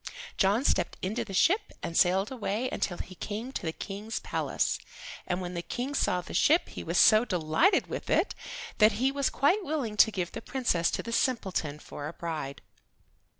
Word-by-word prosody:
John 205 Hz, +7 st, +2 dB
stepped -, -, +1 dB
into 215 Hz, +6 st, -1 dB
the 225 Hz, -, -10 dB
ship 395 Hz, -, +3 dB
and 165 Hz, -, -4 dB
sailed 190 Hz, +5 st, +3 dB
away 230 Hz, -1 st, -2 dB
until 175 Hz, -, -2 dB
he 185 Hz, -, -7 dB
came 215 Hz, +7 st, -5 dB
to -, -, -4 dB
the 160 Hz, -, -2 dB
King's 205 Hz, +6 st, -5 dB
palace, -, -, -1 dB, 0.5 s
and 180 Hz, 0 st, -1 dB
when 180 Hz, 0 st, -5 dB
the 170 Hz, -, -3 dB
King 255 Hz, +9 st, -4 dB
saw 180 Hz, -9 st, +1 dB
the -, -, -10 dB
ship 320 Hz, +4 st, +3 dB
he -, -, -7 dB
was -, -, -1 dB
so 215 Hz, 0 st, +7 dB
delighted 180 Hz, -, +2 dB
with -, -, -6 dB
it -, -, +2 dB, 0.5 s
that 215 Hz, 0 st, +6 dB
he 255 Hz, +6 st, +1 dB
was 280 Hz, -1 st, 0 dB
quite 360 Hz, +10 st, +2 dB
willing 275 Hz, -10 st, -2 dB
to 220 Hz, -, +7 dB
give 180 Hz, -5 st, -3 dB
the -, -, -6 dB
Princess 235 Hz, -10 st, 0 dB
to -, -, -3 dB
the 230 Hz, -, -6 dB
simpleton 190 Hz, -, 0 dB
for 145 Hz, -1 st, -8 dB
a 155 Hz, -, -6 dB
bride. 155 Hz, -6 st, -5 dB
210 Hz, 195 wpm, -29 LUFS, 180-255 Hz, 0.5 s, so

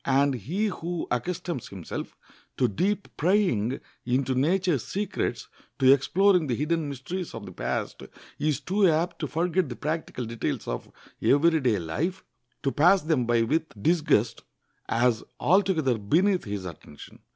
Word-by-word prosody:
And 140 Hz, +1 st, +3 dB
he 150 Hz, -, -2 dB
who 175 Hz, -4 st, -3 dB
accustoms 160 Hz, +2 st, -2 dB
himself 95 Hz, -4 st, -7 dB, 0.4 s
to 125 Hz, -, +3 dB
deep 195 Hz, -, -1 dB
prying 150 Hz, -, +2 dB, 0.2 s
into 130 Hz, +1 st, 0 dB
nature's 160 Hz, -, +1 dB
secrets, 200 Hz, 0 st, -3 dB, 0.3 s
to 130 Hz, 0 st, +7 dB
exploring 180 Hz, +4 st, +3 dB
the 125 Hz, -, 0 dB
hidden 155 Hz, +2 st, -1 dB
mysteries 165 Hz, +7 st, -5 dB
of 110 Hz, -3 st, -7 dB
the -, -, -9 dB
past, -, -, -3 dB, 0.4 s
is 150 Hz, -1 st, +1 dB
too 195 Hz, +2 st, +2 dB
apt 165 Hz, +3 st, 0 dB
to 150 Hz, -, -2 dB
forget 170 Hz, +2 st, 0 dB
the 120 Hz, -, -5 dB
practical 150 Hz, -4 st, -3 dB
details 115 Hz, 0 st, -3 dB
of -, -, -4 dB, 0.3 s
every 160 Hz, +3 st, +4 dB
day 125 Hz, -7 st, +2 dB
life, 150 Hz, -, -3 dB, 0.4 s
to 135 Hz, -, +1 dB
pass 175 Hz, +6 st, +4 dB
them 150 Hz, -7 st, +1 dB
by 120 Hz, -1 st, +3 dB
with 155 Hz, -2 st, -1 dB
disgust, 150 Hz, -5 st, +2 dB, 0.5 s
as 115 Hz, -1 st, +2 dB, 0.2 s
altogether 165 Hz, -, +2 dB
beneath 180 Hz, -, +2 dB
his 100 Hz, -3 st, -4 dB
attention. 80 Hz, -4 st, -11 dB
150 Hz, 145 wpm, -26 LUFS, 120-175 Hz, 0.5 s, to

